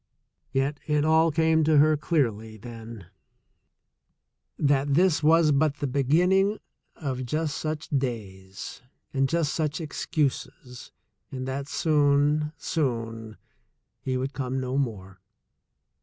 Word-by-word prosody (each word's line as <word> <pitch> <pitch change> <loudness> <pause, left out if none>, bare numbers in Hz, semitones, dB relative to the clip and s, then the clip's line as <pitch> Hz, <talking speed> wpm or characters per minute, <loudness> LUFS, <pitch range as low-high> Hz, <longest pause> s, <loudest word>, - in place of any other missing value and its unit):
Yet 135 +2 0
it 150 -1 +2
all 160 +1 +4
came 160 0 +2
to 155 0 +4
her 155 +2 +5
clearly 115 -9 -1
then 115 -2 -10 1.5
that 140 -1 +2
this 180 -1 +3
was 160 0 +5
but 145 0 +2
the 145 - -4
be 140 +1 0
ginning 190 +8 +3 0.4
of 130 -4 -4
just 150 +3 -2
such 155 0 -4
days 100 -10 -4 0.3
and 135 -1 +1
just 165 -3 0
such 155 -1 -1
excuses, 140 -5 -3 0.4
and 130 -1 -5
that 135 +1 -3
soon, 150 0 +2
soon, 115 - -3 0.6
he 130 -1 -2
would 135 +2 -3
come 130 -1 -3
no 130 0 -3
more. 100 -9 -3
140 Hz, 120 wpm, -26 LUFS, 125-155 Hz, 1.5 s, her